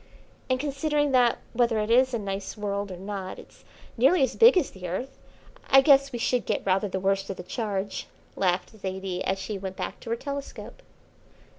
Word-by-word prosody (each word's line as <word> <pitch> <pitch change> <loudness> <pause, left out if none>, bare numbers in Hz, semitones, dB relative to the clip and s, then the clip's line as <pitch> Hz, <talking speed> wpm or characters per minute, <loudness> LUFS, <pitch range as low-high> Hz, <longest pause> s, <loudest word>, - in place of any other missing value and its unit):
"And 255 0 +1
considering 290 +1 0
that, 245 -2 +4 0.2
whether 235 -2 +2
it 215 +1 -1
is 255 +2 +5
a 240 - -1
nice 200 0 -5
world 200 -1 -3
or 180 - -7
not 190 0 -6
it's - - -15 0.3
nearly 270 +7 +4
as 260 -1 0
big 465 -3 +7
as 335 - +1
the 180 -1 -8
Earth, 245 +10 -5 0.5
I 270 - +8
guess 275 -1 +5
we 245 - -4
should 245 +1 0
get - - -1
rather 195 +2 +2
the 190 - -2
worst 195 0 0
of 195 - -4
the 180 - -7
charge," 200 -2 -3 0.3
laughed 180 -1 0
Zaidie 190 -2 -4
as 190 - 0
she 200 +1 -5
went 190 -1 -6
back - - -5
to - - -10
her 230 - +1
telescope. 280 +3 -7
215 Hz, 195 wpm, -26 LUFS, 195-265 Hz, 0.5 s, I